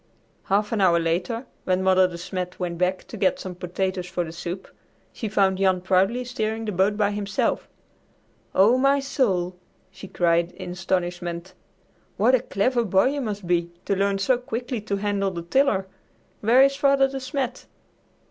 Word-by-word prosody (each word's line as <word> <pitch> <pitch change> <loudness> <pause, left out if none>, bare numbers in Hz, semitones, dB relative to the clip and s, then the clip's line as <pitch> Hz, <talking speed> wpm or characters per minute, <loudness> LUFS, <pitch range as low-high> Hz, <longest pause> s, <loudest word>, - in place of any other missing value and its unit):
Half 205 +2 +1
an 220 -3 0
hour 175 -3 +5
later, 180 +9 -1 0.2
when 185 0 +1
Mother 185 0 +5
De 175 -2 -8
Smet 180 +1 -5
went 175 -2 -3
back 185 +1 0
to - - -10
get 190 -2 +1
some 185 - -6
potatoes 180 +1 -3
for 180 -1 -2
the 160 - -7
soup, 175 +3 -6 0.5
she 220 - -4
found 195 -2 +2
Jan 190 -2 +3
proudly 190 +7 +2
steering 225 -2 -3
the 210 - -2
boat 195 +2 +1
by 205 -1 +2
himself. 205 -1 -1 0.9
"Oh, 220 +7 +5
my 275 +1 +4
soul!" 195 -10 0 0.4
she 190 +1 -10
cried 170 -1 +1
in - - -7
astonishment. 175 -1 -3 0.6
"What 235 +5 +4
a 260 - +5
clever 240 +2 0
boy 195 +3 +3
you 285 +1 -2
must 205 -5 -4
be 170 -1 +1 0.2
to 200 - +1
learn 200 +1 +1
so 240 +6 +2
quickly 245 -1 -4
to 205 -1 -2
handle 200 -1 0
the 170 -3 -6
tiller. 205 0 +2 0.5
Where 240 +5 +5
is 275 0 +3
Father 275 -1 +4
De 270 0 -5
Smet?" 260 -1 -4
195 Hz, 175 wpm, -24 LUFS, 180-230 Hz, 0.9 s, hour